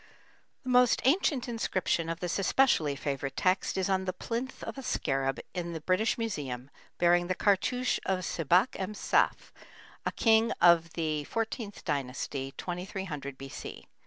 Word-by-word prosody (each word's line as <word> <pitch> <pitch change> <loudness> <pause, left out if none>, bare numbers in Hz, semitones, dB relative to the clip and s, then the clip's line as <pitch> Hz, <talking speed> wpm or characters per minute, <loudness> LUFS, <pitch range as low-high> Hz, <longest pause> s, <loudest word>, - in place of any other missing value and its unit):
The 255 - -5
most 250 -1 +4
ancient 280 -3 +2
inscription 185 -7 -1
of 165 0 -4
this 180 +1 -1
especially 190 - +3
favorite 135 -1 -3
text 185 +1 +1
is 190 - +1
on 190 -1 +1
the 185 - -2
plinth 240 +7 -4
of - - -5
a - - -5
scarab 135 - -1
in 175 -2 -3
the 165 - -4
British 185 +7 +1
Museum 145 - -4 0.3
bearing 175 0 +3
the 185 - 0
cartouche 245 +7 +1
of 190 -1 0
Sebak 175 - +3
em 195 +2 -3
saf, - - +1 0.5
a - - -1
king 225 0 +3
of 165 -1 +5
the 155 -3 -1
XIV 225 -2 -3
Dynasty, 135 -2 -3
2300 175 -6 -5
B.C. 135 0 -8
180 Hz, 150 wpm, -30 LUFS, 150-220 Hz, 0.5 s, of